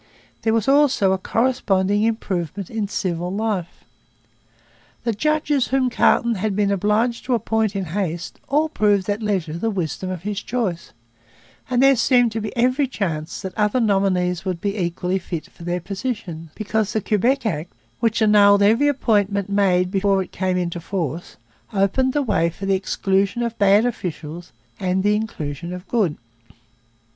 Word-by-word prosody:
There 225 Hz, -, +1 dB
was 225 Hz, -2 st, 0 dB
also 270 Hz, -8 st, +4 dB
a 190 Hz, -, +1 dB
corresponding 205 Hz, -4 st, +1 dB
improvement 195 Hz, -5 st, -2 dB
in 220 Hz, -2 st, -2 dB
civil 180 Hz, -3 st, -2 dB
life. 200 Hz, -4 st, -3 dB, 1.2 s
The 230 Hz, -, 0 dB
judges 295 Hz, +2 st, +1 dB
whom 260 Hz, -1 st, +1 dB
Carleton 235 Hz, 0 st, +3 dB
had 210 Hz, -2 st, 0 dB
been 205 Hz, -1 st, +1 dB
obliged 210 Hz, +5 st, +1 dB
to 250 Hz, -, +2 dB
appoint 220 Hz, -2 st, 0 dB
in 195 Hz, -1 st, -2 dB
haste 175 Hz, -1 st, -4 dB
all 300 Hz, +3 st, +2 dB
proved 205 Hz, -9 st, +1 dB
at 205 Hz, +2 st, -3 dB
leisure 190 Hz, -7 st, -1 dB
the 225 Hz, -, 0 dB
wisdom 185 Hz, -2 st, -3 dB
of 180 Hz, -2 st, -5 dB
his 205 Hz, -1 st, -3 dB
choice; 215 Hz, -9 st, -3 dB, 0.8 s
and 250 Hz, 0 st, +2 dB
there 275 Hz, 0 st, +6 dB
seemed 245 Hz, -1 st, +3 dB
to 225 Hz, 0 st, -3 dB
be 210 Hz, -1 st, -4 dB
every 255 Hz, +4 st, +2 dB
chance 165 Hz, -10 st, -3 dB
that 190 Hz, -1 st, -5 dB
other 210 Hz, +3 st, +1 dB
nominees 190 Hz, -5 st, +1 dB
would 185 Hz, -3 st, -3 dB
be 200 Hz, +2 st, -2 dB
equally 180 Hz, 0 st, -1 dB
fit 170 Hz, -3 st, -5 dB
for -, -, -19 dB
their 175 Hz, +1 st, -1 dB
positions, 190 Hz, -4 st, -5 dB
because 215 Hz, -1 st, -1 dB
the 220 Hz, -, 0 dB
Quebec 240 Hz, +7 st, +1 dB
Act, 170 Hz, -5 st, -2 dB, 0.3 s
which 230 Hz, -1 st, +1 dB
annulled 205 Hz, -1 st, +6 dB
every 230 Hz, +8 st, +4 dB
appointment 205 Hz, -7 st, +1 dB
made 185 Hz, -2 st, +2 dB
before 195 Hz, 0 st, +2 dB
it -, -, -15 dB
came 185 Hz, -1 st, -1 dB
into 175 Hz, -1 st, -2 dB
force, 170 Hz, -2 st, -4 dB, 0.4 s
opened 210 Hz, +7 st, +1 dB
the 290 Hz, -, +1 dB
way 195 Hz, -8 st, +1 dB
for 185 Hz, +4 st, -8 dB
the 195 Hz, -, +2 dB
exclusion 195 Hz, +3 st, 0 dB
of 235 Hz, -1 st, -2 dB
bad 200 Hz, +2 st, +5 dB
officials 175 Hz, -6 st, -5 dB, 0.3 s
and 190 Hz, -1 st, 0 dB
the 205 Hz, +1 st, +3 dB
inclusion 170 Hz, -7 st, -4 dB
of 180 Hz, +1 st, -7 dB
the -, -, -31 dB
good. 200 Hz, -10 st, +1 dB
200 Hz, 165 wpm, -21 LUFS, 180-225 Hz, 1.2 s, there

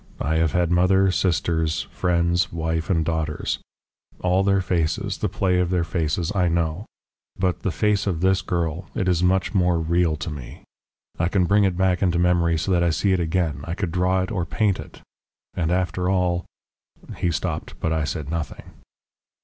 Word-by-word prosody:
I 80 Hz, +3 st, 0 dB
have 80 Hz, -1 st, +1 dB
had 90 Hz, -1 st, +1 dB
mother, 95 Hz, +2 st, +4 dB
sisters, 80 Hz, -3 st, 0 dB
friends, 85 Hz, 0 st, +1 dB
wife, 80 Hz, -1 st, -2 dB
and 80 Hz, -4 st, +2 dB
daughters 80 Hz, -2 st, -2 dB, 0.6 s
all 90 Hz, +1 st, +3 dB
their 100 Hz, 0 st, +3 dB
faces, 85 Hz, -4 st, -1 dB
the -, -, 0 dB
play 90 Hz, -2 st, +1 dB
of 90 Hz, -1 st, +1 dB
their 90 Hz, -2 st, +1 dB
faces, 85 Hz, +1 st, -1 dB
I 90 Hz, -3 st, +2 dB
know. 85 Hz, +3 st, -1 dB, 0.5 s
But 90 Hz, -2 st, 0 dB
the -, -, -2 dB
face 105 Hz, +2 st, +1 dB
of 90 Hz, -5 st, 0 dB
this 95 Hz, +1 st, +3 dB
girl 85 Hz, -1 st, -2 dB
it 95 Hz, -, -1 dB
is 90 Hz, -2 st, +2 dB
much 95 Hz, +3 st, +2 dB
more 90 Hz, -3 st, +3 dB
real 85 Hz, 0 st, +1 dB
to 75 Hz, +2 st, -5 dB
me. 70 Hz, -5 st, -9 dB, 0.6 s
I 85 Hz, -, +2 dB
can 90 Hz, 0 st, +2 dB
bring 100 Hz, +3 st, +4 dB
it 95 Hz, -2 st, 0 dB
back 95 Hz, -1 st, +2 dB
into 90 Hz, -3 st, +2 dB
memory 85 Hz, -1 st, +2 dB
so 90 Hz, +5 st, -2 dB
that 90 Hz, -1 st, +3 dB
I 85 Hz, -, +3 dB
see 95 Hz, +4 st, +1 dB
it 95 Hz, -, +1 dB
again 80 Hz, -4 st, -1 dB
I 85 Hz, -, -3 dB
could 95 Hz, -4 st, -3 dB
draw 90 Hz, +1 st, +1 dB
it 95 Hz, -, -5 dB
or 90 Hz, -6 st, -1 dB
paint 100 Hz, +3 st, 0 dB
it. -, -, -10 dB, 0.5 s
And 85 Hz, -1 st, -1 dB
after 90 Hz, 0 st, 0 dB
all 90 Hz, -2 st, +1 dB, 0.3 s
" -, -, -15 dB
He 85 Hz, -, +1 dB
stopped 80 Hz, -1 st, -3 dB
but 80 Hz, -, 0 dB
I 80 Hz, -1 st, 0 dB
said 75 Hz, 0 st, -4 dB
nothing. 85 Hz, -2 st, -4 dB
90 Hz, 190 wpm, -23 LUFS, 80-95 Hz, 0.6 s, mother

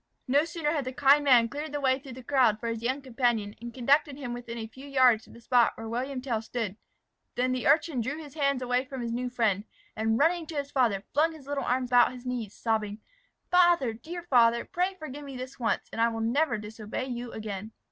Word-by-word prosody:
No 285 Hz, +4 st, +3 dB
sooner 330 Hz, -3 st, -2 dB
had 295 Hz, -4 st, -1 dB
the 255 Hz, -, -3 dB
kind 280 Hz, +2 st, +5 dB
man 245 Hz, -5 st, +6 dB
cleared 295 Hz, +4 st, -5 dB
the 290 Hz, -, -1 dB
way 260 Hz, -1 st, +2 dB
through 270 Hz, -2 st, -10 dB
the 255 Hz, +1 st, -10 dB
crowd 245 Hz, -5 st, +3 dB
for 235 Hz, -, -3 dB
his 230 Hz, -1 st, -3 dB
young 260 Hz, +4 st, -1 dB
companion, 240 Hz, -5 st, 0 dB
and 235 Hz, 0 st, -6 dB
conducted 275 Hz, +4 st, +2 dB
him 250 Hz, -4 st, -5 dB
within 240 Hz, -1 st, -7 dB
a 225 Hz, -, -4 dB
few 260 Hz, +5 st, -12 dB
yards 255 Hz, -5 st, +4 dB
of -, -, -15 dB
the -, -, -13 dB
spot 245 Hz, 0 st, +3 dB
where 225 Hz, -, -6 dB
William 255 Hz, +3 st, -3 dB
Tell 235 Hz, -5 st, -1 dB
stood, 225 Hz, -3 st, -4 dB, 0.6 s
than 255 Hz, +1 st, +1 dB
the 255 Hz, -1 st, -1 dB
urchin 300 Hz, -4 st, +3 dB
drew 270 Hz, +6 st, -3 dB
his 300 Hz, -4 st, -10 dB
hand 280 Hz, -4 st, 0 dB
away 250 Hz, +1 st, +1 dB
from 265 Hz, -1 st, -7 dB
his 235 Hz, -, -3 dB
new 250 Hz, +1 st, -2 dB
friend, 220 Hz, -5 st, +1 dB, 0.3 s
and 220 Hz, +1 st, +1 dB
running 325 Hz, +3 st, +2 dB
to 320 Hz, -, -7 dB
his 280 Hz, 0 st, -3 dB
father, 225 Hz, -7 st, +2 dB
flung 320 Hz, +3 st, +3 dB
his 305 Hz, -4 st, -13 dB
little 285 Hz, 0 st, -2 dB
arms 250 Hz, 0 st, 0 dB
about 245 Hz, 0 st, +5 dB
his 250 Hz, 0 st, -11 dB
knees, 240 Hz, -5 st, -4 dB
sobbing, 215 Hz, -2 st, -1 dB, 0.5 s
"Father, 345 Hz, -9 st, +4 dB
dear 335 Hz, +10 st, -8 dB
father, 235 Hz, -6 st, +4 dB
pray 365 Hz, +2 st, -1 dB
forgive 295 Hz, -3 st, -7 dB
me 275 Hz, -2 st, -8 dB
this 255 Hz, +2 st, -8 dB
once, 230 Hz, -2 st, 0 dB
and 225 Hz, -, -2 dB
I 230 Hz, -, +5 dB
will 225 Hz, -1 st, -4 dB
never 240 Hz, +2 st, +1 dB
disobey 215 Hz, +3 st, -5 dB
you 245 Hz, -2 st, -5 dB
again." 215 Hz, -1 st, -6 dB
250 Hz, 230 wpm, -28 LUFS, 230-280 Hz, 0.6 s, man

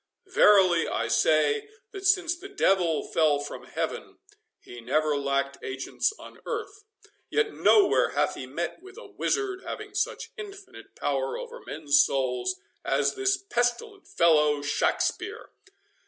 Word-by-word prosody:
Verily, 195 Hz, -, +5 dB
I -, -, -1 dB
say, 425 Hz, -, +2 dB, 0.2 s
that 390 Hz, -1 st, -3 dB
since 370 Hz, -3 st, +3 dB
the 375 Hz, +3 st, -11 dB
devil 185 Hz, -, +2 dB
fell 155 Hz, -3 st, +2 dB
from 145 Hz, 0 st, -7 dB
Heaven, -, -, -5 dB, 0.4 s
he 120 Hz, 0 st, -11 dB
never 150 Hz, +5 st, +1 dB
lacked 140 Hz, 0 st, -1 dB
agents 135 Hz, -, -2 dB
on -, -, -13 dB
earth; 420 Hz, -3 st, -5 dB, 0.4 s
yet 440 Hz, 0 st, 0 dB
nowhere 405 Hz, -3 st, +4 dB
hath -, -, 0 dB
he -, -, -7 dB
met -, -, -4 dB
with 385 Hz, +3 st, -14 dB
a 485 Hz, -, -10 dB
wizard 390 Hz, -2 st, -2 dB
having -, -, -7 dB
such -, -, -2 dB
infinite 400 Hz, -2 st, -11 dB
power 475 Hz, -1 st, -2 dB
over 485 Hz, -1 st, -8 dB
men's 145 Hz, -2 st, +2 dB
souls 135 Hz, -, 0 dB, 0.3 s
as -, -, +1 dB
this 390 Hz, 0 st, +1 dB
pestilent 375 Hz, -, -2 dB
fellow 150 Hz, -3 st, +3 dB
Shakspeare. 145 Hz, -, -1 dB
245 Hz, 135 wpm, -27 LUFS, -, 0.4 s, Verily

